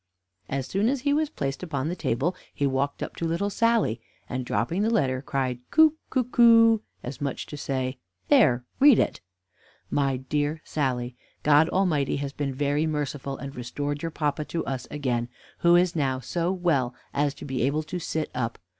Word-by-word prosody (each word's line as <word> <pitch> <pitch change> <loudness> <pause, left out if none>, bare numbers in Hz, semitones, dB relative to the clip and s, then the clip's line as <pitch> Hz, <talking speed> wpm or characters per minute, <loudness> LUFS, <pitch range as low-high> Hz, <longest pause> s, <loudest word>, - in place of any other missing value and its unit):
As 135 -1 -2
soon 200 - +1
as 270 -1 -1
he 285 +2 +2
was 305 0 +1
placed 140 - -3
upon 145 -6 -2
the 175 - -2
table, 165 +5 -1 0.2
he 140 - 0
walked 140 +1 -1
up - - -6
to 165 - -1
little 170 +5 -1
Sally, 230 - +2 0.3
and 130 0 -3
dropping 120 - -1
the 220 - +2
letter, 130 - +1
cried 130 -3 -2
"Co, 315 -1 +6 0.2
co, 260 - +1
coo;" 230 -2 +6 0.2
as 125 +1 -7
much 140 -2 -2
as - - -17
to 150 - -6
say, 130 -2 -2 0.3
"There, 135 - +4
read 280 -4 +7
it." - - 0 0.7
"My 135 -2 +1
dear 145 +4 -1
Sally 125 -4 -2 0.3
God 150 +2 +5
Almighty 165 -8 +1
has 140 -1 -4
been 145 -2 -2
very 145 +3 0
merciful 145 -2 -3
and 140 0 -7
restored 145 +4 -4
your 165 - -2
papa 150 -2 -1
to 165 - -3
us 135 -2 -4
again, 125 -5 -1 0.3
who 170 0 +5
is 175 0 +3
now 135 -4 0
so 170 +7 -1
well 150 -10 0 0.2
as 145 0 0
to - - -9
be 135 -2 -2
able 140 +5 +1
to 180 +3 -5
sit 160 -2 -3
up. 115 -2 -2
145 Hz, 190 wpm, -26 LUFS, 130-175 Hz, 0.7 s, read